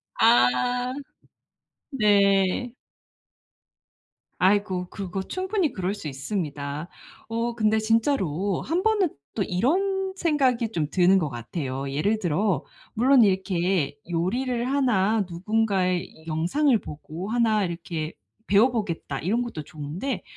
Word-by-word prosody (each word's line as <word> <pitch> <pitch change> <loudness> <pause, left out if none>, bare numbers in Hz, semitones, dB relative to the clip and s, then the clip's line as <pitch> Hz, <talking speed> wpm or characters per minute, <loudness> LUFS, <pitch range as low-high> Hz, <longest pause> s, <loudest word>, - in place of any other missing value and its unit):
아. 245 - +3 1.0
네. 205 -2 +3 1.7
아이고 185 -1 +2
그거 195 -1 -5
충분히 375 - -1
그럴 190 +1 -2
수 200 -6 -7
있습니다. 145 0 -4 0.4
어 230 +1 -2
근데 220 -1 +2
진짜로 205 - +1
한번은 375 +2 +1 0.2
또 205 - 0
이런 380 - 0
생각이 265 -10 +1
좀 155 -7 -1
드는 185 +2 +4
것 155 -5 -1
같아요. 130 +2 -4
예를 200 +10 +1
들어 180 -2 0 0.3
물론 250 +1 +5
이렇게 185 -6 +1
요리를 235 +9 -1
하나 225 -6 +2
'누군가의 190 -1 0
이 160 - -18
영상을 200 - +2
보고 160 +6 -8
하나 225 -3 +2
이렇게 170 -2 -4 0.3
배워 215 +6 +5
보겠다.' 170 - -3
이런 210 - 0
것도 200 -11 -6
좋은데 155 - -5
200 Hz, 235 characters per minute, -25 LUFS, 170-240 Hz, 1.7 s, 물론